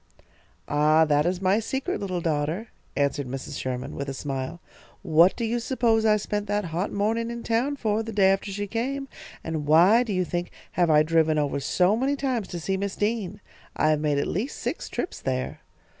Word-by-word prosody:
"Ah, 155 Hz, +2 st, +4 dB
that 150 Hz, +1 st, +2 dB
is 185 Hz, +1 st, -2 dB
my 190 Hz, +3 st, +3 dB
secret, 265 Hz, +4 st, -2 dB
little 185 Hz, -3 st, -2 dB
daughter," 160 Hz, +7 st, -1 dB, 0.3 s
answered 140 Hz, -1 st, 0 dB
Mrs. 135 Hz, +1 st, -5 dB
Sherman, 125 Hz, 0 st, -4 dB
with 140 Hz, 0 st, -4 dB
a 135 Hz, -, -4 dB
smile. 135 Hz, +3 st, -4 dB, 0.4 s
"What 170 Hz, +1 st, +5 dB
do 235 Hz, -, -2 dB
you 235 Hz, +2 st, 0 dB
suppose 230 Hz, -3 st, +1 dB
I 215 Hz, 0 st, +5 dB
spent 205 Hz, 0 st, -3 dB
that 205 Hz, 0 st, 0 dB
hot 180 Hz, +5 st, -1 dB
morning 225 Hz, +3 st, 0 dB
in 235 Hz, 0 st, -6 dB
town 240 Hz, +5 st, 0 dB
for, 220 Hz, -5 st, 0 dB
the 225 Hz, 0 st, -5 dB
day 195 Hz, -2 st, +4 dB
after 195 Hz, +1 st, -1 dB
she 205 Hz, +1 st, -3 dB
came, 260 Hz, +6 st, -3 dB, 0.4 s
and 155 Hz, -3 st, -3 dB
why, 175 Hz, +10 st, +6 dB
do 240 Hz, -4 st, -2 dB
you 185 Hz, -2 st, +1 dB
think, 175 Hz, 0 st, -3 dB, 0.2 s
have 175 Hz, -2 st, +2 dB
I 150 Hz, -1 st, +6 dB
driven 160 Hz, -1 st, +2 dB
over 145 Hz, -1 st, 0 dB
so 180 Hz, +8 st, +2 dB
many 270 Hz, +5 st, +1 dB
times 255 Hz, -7 st, -1 dB
to 175 Hz, -, -5 dB
see 190 Hz, +4 st, -1 dB
Miss 200 Hz, 0 st, -3 dB
Dean? 210 Hz, -2 st, -2 dB, 0.3 s
I 155 Hz, -, +3 dB
have 155 Hz, -, +2 dB
made 150 Hz, -1 st, +1 dB
at 140 Hz, -, +1 dB
least 220 Hz, -, -3 dB
six -, -, -4 dB
trips -, -, -4 dB
there." 130 Hz, -1 st, -2 dB
190 Hz, 205 wpm, -25 LUFS, 155-225 Hz, 0.4 s, why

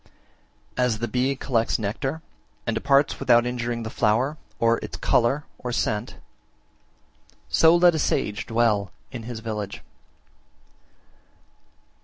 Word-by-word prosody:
49. 125 Hz, -, +3 dB
As 115 Hz, -3 st, -1 dB
the 120 Hz, +2 st, -2 dB
bee 125 Hz, +4 st, 0 dB
collects 115 Hz, -4 st, 0 dB
nectar 135 Hz, +9 st, -3 dB, 0.4 s
and 115 Hz, -, 0 dB
departs 140 Hz, +4 st, +2 dB
without 120 Hz, 0 st, +4 dB
injuring 120 Hz, -1 st, -2 dB
the 110 Hz, -, -5 dB
flower, 120 Hz, +7 st, +1 dB, 0.2 s
or 115 Hz, 0 st, +2 dB
its -, -, -7 dB
colour 130 Hz, +5 st, +2 dB, 0.2 s
or 125 Hz, -, -4 dB
scent, 110 Hz, -2 st, -1 dB, 1.3 s
so 165 Hz, +1 st, +5 dB
let 175 Hz, 0 st, +6 dB
a 160 Hz, -, -1 dB
sage 105 Hz, -6 st, -1 dB
dwell 110 Hz, -5 st, +1 dB, 0.2 s
in 125 Hz, -3 st, -6 dB
his 115 Hz, -2 st, -6 dB
village. 105 Hz, -3 st, -5 dB
120 Hz, 125 wpm, -24 LUFS, 110-135 Hz, 1.3 s, let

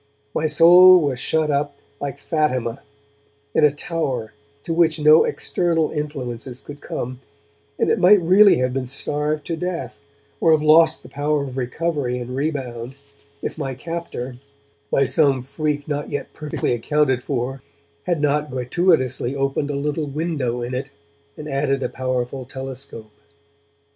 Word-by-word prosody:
My 155 Hz, -, 0 dB
soul 175 Hz, +4 st, +8 dB
was 140 Hz, -6 st, -1 dB
shut 155 Hz, +2 st, 0 dB
up, 145 Hz, 0 st, -1 dB, 0.2 s
like 140 Hz, -3 st, -4 dB
Fatima, 130 Hz, -8 st, -1 dB, 0.7 s
in -, -, +3 dB
a 150 Hz, -, +7 dB
tower 140 Hz, -7 st, -3 dB, 0.3 s
to 165 Hz, -, -3 dB
which 165 Hz, -1 st, +2 dB
no 155 Hz, +1 st, +6 dB
external 165 Hz, -3 st, 0 dB
influences 130 Hz, -5 st, -5 dB
could 145 Hz, 0 st, -11 dB
come, 125 Hz, +1 st, -5 dB, 0.6 s
and -, -, +1 dB
it -, -, +2 dB
might 200 Hz, +3 st, +7 dB
really 190 Hz, +4 st, +6 dB
have 125 Hz, 0 st, 0 dB
been 130 Hz, -1 st, -2 dB
starved 150 Hz, +3 st, -2 dB
to 165 Hz, -, -2 dB
death, 160 Hz, -11 st, -4 dB, 0.4 s
or 165 Hz, -, +4 dB
have 155 Hz, -1 st, +2 dB
lost 160 Hz, +1 st, +5 dB
the -, -, -13 dB
power 145 Hz, 0 st, -1 dB
of 130 Hz, -2 st, -7 dB
recovery 135 Hz, 0 st, -2 dB
and 125 Hz, +1 st, -6 dB
rebound, 130 Hz, -4 st, -3 dB, 0.5 s
if -, -, -4 dB
my 135 Hz, -1 st, -3 dB
captor, 135 Hz, -5 st, -6 dB, 0.5 s
by 140 Hz, -, +3 dB
some 135 Hz, -1 st, +2 dB
freak 145 Hz, +1 st, -3 dB
not 145 Hz, -1 st, -3 dB
yet 145 Hz, -1 st, -5 dB
perfectly 150 Hz, -4 st, -2 dB
accounted 130 Hz, +1 st, +1 dB
for, 130 Hz, 0 st, -3 dB, 0.4 s
had 175 Hz, -3 st, 0 dB
not 150 Hz, +1 st, +1 dB
gratuitously 130 Hz, -1 st, +1 dB
opened 135 Hz, +1 st, -1 dB
a 145 Hz, -, -2 dB
little 150 Hz, +2 st, -2 dB
window 140 Hz, -5 st, -2 dB
in 120 Hz, +2 st, -5 dB
it 130 Hz, +2 st, -3 dB, 0.5 s
and 150 Hz, -, -7 dB
added 135 Hz, -1 st, 0 dB
a -, -, -1 dB
powerful 130 Hz, 0 st, -3 dB
telescope. 130 Hz, -3 st, -8 dB
145 Hz, 150 wpm, -21 LUFS, 130-155 Hz, 0.7 s, soul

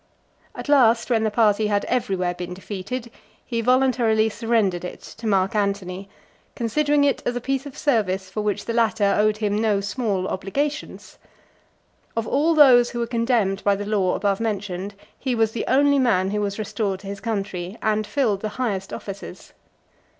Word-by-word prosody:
At -, -, -7 dB
last, 245 Hz, -4 st, +4 dB
when 225 Hz, -2 st, +3 dB
the 220 Hz, -, +2 dB
party 215 Hz, -1 st, +2 dB
had 205 Hz, -1 st, 0 dB
everywhere 190 Hz, -7 st, -1 dB
been 180 Hz, 0 st, -6 dB
defeated, 210 Hz, +6 st, -6 dB, 0.3 s
he 230 Hz, -2 st, -2 dB
voluntarily 245 Hz, -3 st, +3 dB
surrendered 220 Hz, -6 st, 0 dB
it 180 Hz, -, -7 dB
to -, -, -13 dB
(339) -, -, +2 dB
Mark 195 Hz, -1 st, +2 dB
Antony; 200 Hz, -2 st, -2 dB, 0.5 s
considering 290 Hz, +5 st, +1 dB
it 280 Hz, -1 st, +1 dB
as 245 Hz, -, -2 dB
a -, -, -1 dB
piece 270 Hz, +3 st, -2 dB
of 275 Hz, -, -11 dB
service 195 Hz, -8 st, 0 dB
for 205 Hz, +3 st, -4 dB
which 210 Hz, -2 st, -2 dB
the 230 Hz, -, -2 dB
latter 225 Hz, -3 st, +2 dB
owed 215 Hz, 0 st, +2 dB
him 210 Hz, -1 st, -1 dB
no 215 Hz, -3 st, +2 dB
small 200 Hz, -2 st, -2 dB
obligations. 280 Hz, +12 st, -4 dB, 1.0 s
Of 225 Hz, -1 st, -1 dB
all 315 Hz, +4 st, +2 dB
those 250 Hz, -5 st, +7 dB
who 240 Hz, -, -5 dB
were 235 Hz, -, 0 dB
condemned 230 Hz, -5 st, 0 dB
by 200 Hz, -1 st, +3 dB
the 205 Hz, +1 st, -5 dB
law 200 Hz, -3 st, +1 dB
above 200 Hz, -1 st, 0 dB
mentioned, 200 Hz, -3 st, -3 dB, 0.2 s
he 260 Hz, -2 st, -1 dB
was 225 Hz, -1 st, +2 dB
the 225 Hz, -, -3 dB
only 285 Hz, +1 st, +4 dB
man 195 Hz, -7 st, +2 dB
who 210 Hz, 0 st, -1 dB
was 200 Hz, -1 st, -2 dB
restored 205 Hz, -3 st, -2 dB
to 200 Hz, -, -10 dB
his 200 Hz, 0 st, -5 dB
country, 195 Hz, -3 st, -4 dB
and 215 Hz, -1 st, +1 dB
filled 210 Hz, -4 st, 0 dB
the 215 Hz, -, -2 dB
highest 200 Hz, -7 st, -2 dB
offices. 195 Hz, -1 st, -8 dB
215 Hz, 180 wpm, -23 LUFS, 195-240 Hz, 1.0 s, those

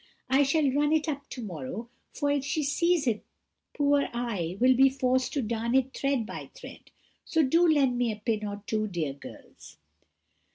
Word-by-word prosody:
I 270 Hz, +2 st, +5 dB
shall 285 Hz, +1 st, +2 dB
run 295 Hz, +2 st, +1 dB
it 315 Hz, 0 st, +1 dB
up 285 Hz, -2 st, -4 dB
to 250 Hz, -, -7 dB
morrow, 180 Hz, -, -6 dB, 0.2 s
for, 285 Hz, 0 st, -1 dB
if 285 Hz, -2 st, 0 dB
she 290 Hz, +2 st, -1 dB
sees 335 Hz, +2 st, +1 dB
it, 225 Hz, -4 st, 0 dB, 0.5 s
poor 285 Hz, -1 st, +2 dB
I 205 Hz, -8 st, -3 dB
will 255 Hz, +1 st, +5 dB
be 270 Hz, +2 st, +6 dB
forced 260 Hz, -1 st, 0 dB
to 280 Hz, -, -1 dB
darn 230 Hz, +2 st, -1 dB
it 265 Hz, 0 st, +2 dB
thread 275 Hz, -4 st, 0 dB
by -, -, -8 dB
thread; -, -, -12 dB, 0.3 s
so 320 Hz, -1 st, +1 dB
do 330 Hz, +6 st, +4 dB
lend 270 Hz, -5 st, +2 dB
me 240 Hz, -2 st, +1 dB
a -, -, -4 dB
pin 215 Hz, 0 st, -2 dB
or 205 Hz, 0 st, -6 dB
two, 215 Hz, 0 st, -1 dB
dear 165 Hz, -8 st, -3 dB
girls." 140 Hz, -, -13 dB
260 Hz, 190 wpm, -28 LUFS, 220-285 Hz, 0.5 s, be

